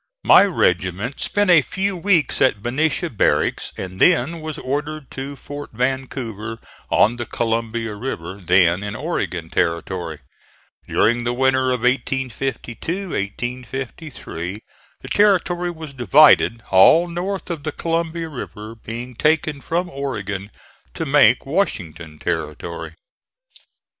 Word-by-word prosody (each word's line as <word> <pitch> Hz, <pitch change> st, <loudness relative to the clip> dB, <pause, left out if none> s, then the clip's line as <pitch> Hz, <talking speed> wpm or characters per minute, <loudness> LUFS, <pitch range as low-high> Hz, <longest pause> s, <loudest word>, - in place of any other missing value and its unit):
My -, -, +7 dB
regiment 100 Hz, -, 0 dB
spent 205 Hz, -2 st, +2 dB
a 170 Hz, -3 st, +7 dB
few 195 Hz, +6 st, -2 dB
weeks 175 Hz, -4 st, +1 dB
at 105 Hz, -6 st, +3 dB
Benicia 150 Hz, +7 st, 0 dB
barracks, 110 Hz, -, +1 dB
and 95 Hz, 0 st, -6 dB
then 155 Hz, +7 st, +3 dB
was 155 Hz, -1 st, -5 dB
ordered 145 Hz, +2 st, -4 dB
to 135 Hz, +1 st, -6 dB
Fort 145 Hz, +2 st, -8 dB
Vancouver, 120 Hz, -3 st, -3 dB, 0.3 s
on 115 Hz, +3 st, +3 dB
the 120 Hz, -, -4 dB
Columbia 115 Hz, -1 st, -2 dB
River, 100 Hz, -5 st, -5 dB
then 90 Hz, 0 st, +4 dB
in 105 Hz, +1 st, -5 dB
Oregon 90 Hz, -, -3 dB
Territory. 85 Hz, -1 st, -1 dB, 0.7 s
During 120 Hz, +2 st, +2 dB
the 120 Hz, +1 st, 0 dB
winter 130 Hz, 0 st, +2 dB
of 125 Hz, -2 st, 0 dB
1852 130 Hz, -, -2 dB, 0.5 s
3 90 Hz, -2 st, -6 dB, 0.4 s
the -, -, -9 dB
territory 180 Hz, -4 st, +2 dB
was 160 Hz, -4 st, -8 dB
divided, 130 Hz, -3 st, +5 dB
all 155 Hz, -, +6 dB
north 180 Hz, +1 st, -4 dB
of 165 Hz, -3 st, -4 dB
the 155 Hz, -, -3 dB
Columbia 165 Hz, +1 st, -2 dB
River 115 Hz, -7 st, -8 dB
being 115 Hz, +2 st, -7 dB
taken 150 Hz, +2 st, +1 dB
from 175 Hz, +5 st, -1 dB
Oregon 105 Hz, -, -4 dB, 0.5 s
to 160 Hz, -, -3 dB
make 135 Hz, -4 st, +5 dB
Washington 85 Hz, -, -2 dB
Territory. 80 Hz, 0 st, -4 dB
130 Hz, 120 wpm, -21 LUFS, 105-155 Hz, 0.7 s, My